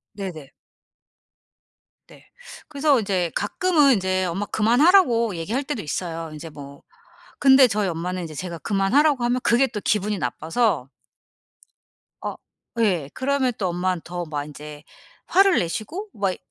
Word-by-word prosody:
네네. 175 Hz, -9 st, -7 dB, 1.6 s
네. -, -, -18 dB, 0.4 s
그래서 285 Hz, -2 st, +2 dB
이제 190 Hz, -5 st, -1 dB
가끔은 295 Hz, -, +3 dB
인제 185 Hz, -3 st, 0 dB
"엄마 185 Hz, +4 st, -2 dB
그만하라고." 235 Hz, -, +3 dB
얘기할 215 Hz, +12 st, -2 dB
때도 280 Hz, -5 st, -4 dB
있어요. 165 Hz, +1 st, -4 dB
인제 155 Hz, +1 st, -8 dB
뭐 140 Hz, -2 st, -12 dB, 0.6 s
근데 265 Hz, -1 st, +6 dB
저희 210 Hz, -3 st, 0 dB
엄마는 180 Hz, +2 st, -3 dB
인제 160 Hz, -2 st, -7 dB
제가 170 Hz, +1 st, -6 dB
그만하라고 250 Hz, -, +2 dB
하면 245 Hz, +1 st, +1 dB
그게 240 Hz, +3 st, +4 dB
또 215 Hz, -3 st, -5 dB
기분이 210 Hz, 0 st, 0 dB
나빠서 160 Hz, -, -1 dB, 1.3 s
어 -, -, -4 dB, 0.5 s
예. 175 Hz, -10 st, +1 dB
그러면 265 Hz, -1 st, 0 dB
또 190 Hz, -, -1 dB
엄마는 180 Hz, 0 st, -1 dB
더 175 Hz, 0 st, -5 dB
막 145 Hz, -2 st, -3 dB
인제 150 Hz, 0 st, -10 dB, 0.4 s
화를 390 Hz, 0 st, +4 dB
내시고 240 Hz, -, -4 dB
막 195 Hz, -3 st, -1 dB
이 -, -, -11 dB
200 Hz, 285 characters per minute, -23 LUFS, 170-255 Hz, 1.6 s, 근데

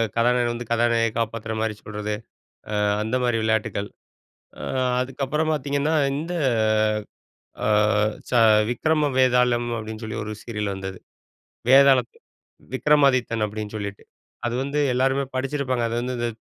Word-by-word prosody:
கதாநாயகன் 120 Hz, +1 st, +2 dB
வந்து 120 Hz, -1 st, -6 dB
கதாநாயகிய 115 Hz, -1 st, +2 dB
காப்பாத்துறமாரி 110 Hz, -1 st, -2 dB
சொல்றது. 105 Hz, 0 st, -4 dB, 0.7 s
அ -, -, +2 dB, 0.2 s
அந்தமாரி 120 Hz, +1 st, 0 dB
விளையாட்டுக்கள். 110 Hz, -2 st, -1 dB, 0.7 s
அ -, -, -7 dB, 0.4 s
அதுக்கப்புறம் 135 Hz, +4 st, -1 dB
பார்த்தீங்கன்னா, 145 Hz, +1 st, 0 dB, 0.2 s
இந்த 165 Hz, +4 st, -4 dB, 1.3 s
அ -, -, +2 dB, 0.6 s
ச -, -, -12 dB, 0.4 s
விக்ரம 150 Hz, +5 st, +1 dB
வேதாளம், 125 Hz, -2 st, +3 dB
அப்பிடின்னு 110 Hz, +1 st, -7 dB
சொல்லி 110 Hz, -, -5 dB
ஒரு 110 Hz, +1 st, -5 dB
சீரியல் 105 Hz, -4 st, -3 dB
வந்தது. 95 Hz, -1 st, -6 dB, 0.7 s
வேதாளம் 135 Hz, -2 st, +6 dB, 0.7 s
விக்கிரமாதித்தன் 130 Hz, -5 st, +3 dB
அப்பிடின்னு 105 Hz, 0 st, -6 dB
சொல்லிட்டு, 100 Hz, -1 st, -6 dB, 0.4 s
அது 120 Hz, -, -2 dB
வந்து 140 Hz, +2 st, -2 dB, 0.2 s
எல்லாருமே 135 Hz, +2 st, +1 dB
படிச்சிருப்பாங்க. 130 Hz, -2 st, -1 dB
அது 115 Hz, -, -3 dB
வந்து 125 Hz, +1 st, -3 dB
இந்த 120 Hz, 0 st, -1 dB
120 Hz, 115 wpm, -23 LUFS, 110-135 Hz, 1.3 s, வேதாளம்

